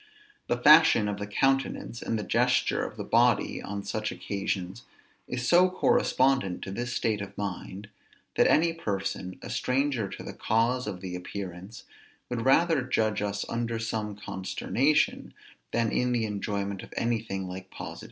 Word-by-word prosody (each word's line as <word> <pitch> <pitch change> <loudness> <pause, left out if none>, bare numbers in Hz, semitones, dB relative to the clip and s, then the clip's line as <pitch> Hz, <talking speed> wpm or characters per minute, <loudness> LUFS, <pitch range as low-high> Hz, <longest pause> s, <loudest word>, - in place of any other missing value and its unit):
The 120 - +1
fashion 150 -5 +7
of 105 -1 -2
the 105 - -4
countenance 135 +1 0
and 115 - -1
the 105 - -3
gesture - - +2
of - - -6
the - - -4
body - - +2
on 100 0 -5
such 110 +1 -3
occasions 100 +1 -3 0.5
is 125 0 -3
so 180 +2 +6
correspondent 135 - +2
to 95 - -6
this 120 +5 -3
state 110 -4 0
of 100 - -8
mind, 100 0 -5 0.5
that - - +5
any 165 +2 +4
person, 95 - -3
a - - -7
stranger 130 -5 0
to - - -8
the - - -7
cause 115 +2 +1
of 95 -3 -5
the 90 -2 -5
appearance, 95 +3 -7 0.5
would 120 -2 -2
rather 160 +2 +4
judge 110 -5 0
us 100 0 -2
under 115 0 -2
some 110 -2 -3
consternation, 105 +8 0 0.4
than 115 -2 +1
in 125 0 +1
the 115 -2 +1
enjoyment 100 -2 -3
of - - -12
anything 110 -5 -1
like 95 +1 -8
positive - - -16
pleasure. - - -7
110 Hz, 160 wpm, -28 LUFS, 100-125 Hz, 0.5 s, fashion